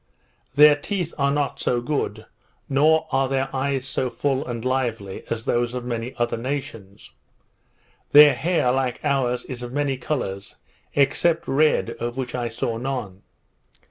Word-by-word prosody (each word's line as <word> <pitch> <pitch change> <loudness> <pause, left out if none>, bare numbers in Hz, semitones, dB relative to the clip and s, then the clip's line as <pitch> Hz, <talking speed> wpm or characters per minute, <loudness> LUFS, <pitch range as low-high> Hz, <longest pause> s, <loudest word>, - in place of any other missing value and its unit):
Their 150 +1 +8
teeth 175 +3 -3
are 140 0 +3
not 145 -1 -1
so 120 - +1
good, 140 +4 -3 0.4
nor 155 +3 +3
are 135 -1 +1
their 135 0 -1
eyes 135 0 -1
so 130 -1 -1
full 135 +3 -1
and 120 -1 -5
lively 120 -7 -2
as 115 -1 -3
those 120 +1 0
of 125 -1 -4
many 120 0 -4
other 120 -1 0
nations. 115 -6 -6 1.0
Their 150 0 +9
hair, 165 -7 +1
like 130 -1 -1
ours, 130 -4 0
is 125 -2 -7
of 120 0 -6
many 145 -2 0
colours, 100 -8 -4 0.4
except 155 +4 +2
red, 150 +3 +2
of 120 +1 -4
which 130 -2 -4
I 120 -1 -2
saw 115 0 -3
none. 120 -7 -4
130 Hz, 150 wpm, -23 LUFS, 120-140 Hz, 1.0 s, Their